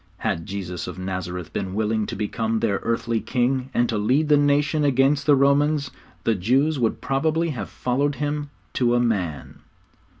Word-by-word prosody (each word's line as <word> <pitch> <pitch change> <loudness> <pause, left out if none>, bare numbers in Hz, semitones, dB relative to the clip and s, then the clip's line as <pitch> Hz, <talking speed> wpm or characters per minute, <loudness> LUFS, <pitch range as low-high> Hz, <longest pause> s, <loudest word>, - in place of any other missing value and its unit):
Had 80 - -2
Jesus 90 -3 -5
of - - -7
Nazareth 90 -2 -5
been 95 -1 -3
willing 110 0 0
to - - -4
become 110 +2 -1
their 105 -4 0
earthly 115 0 -1
king 130 +1 0
and 120 -2 +2
to 110 -3 -1
lead 135 +9 +2
the 150 - +7
nation 145 +1 +2
against 140 +1 +2
the 145 - +7
Romans, 140 +1 +2 0.3
the 115 - +2
Jews 130 - +1
would 115 -3 0
probably 160 +4 0
have 110 -8 -5
followed 140 +3 -1
Him 145 0 -2 0.2
to 120 -1 +2
a - - +3
man. 95 -11 -2
125 Hz, 170 wpm, -23 LUFS, 105-145 Hz, 0.3 s, the